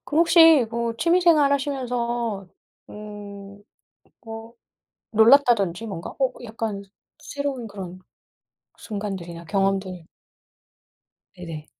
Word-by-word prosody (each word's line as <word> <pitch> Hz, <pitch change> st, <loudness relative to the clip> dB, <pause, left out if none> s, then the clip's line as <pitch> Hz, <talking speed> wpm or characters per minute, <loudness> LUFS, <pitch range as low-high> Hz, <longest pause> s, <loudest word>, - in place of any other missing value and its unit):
그럼 305 Hz, -, -1 dB
혹시 325 Hz, -6 st, +7 dB
뭐 235 Hz, 0 st, -2 dB
취미 345 Hz, +6 st, +3 dB
생활하시면서 250 Hz, -, +1 dB, 0.4 s
음, 205 Hz, -1 st, -10 dB, 0.6 s
뭐 225 Hz, 0 st, -9 dB, 0.6 s
놀랐다든지 225 Hz, -4 st, +4 dB
뭔가 175 Hz, -4 st, -6 dB
어, 265 Hz, -1 st, +2 dB
이 -, -, -9 dB
약간 220 Hz, -3 st, -4 dB, 0.4 s
싫은 280 Hz, -5 st, -4 dB
그런 185 Hz, -3 st, -8 dB, 0.8 s
순간들이나 190 Hz, -6 st, -6 dB
경험들 190 Hz, -2 st, -1 dB, 1.3 s
네네. 165 Hz, -4 st, -8 dB
225 Hz, 205 characters per minute, -23 LUFS, 195-260 Hz, 1.3 s, 혹시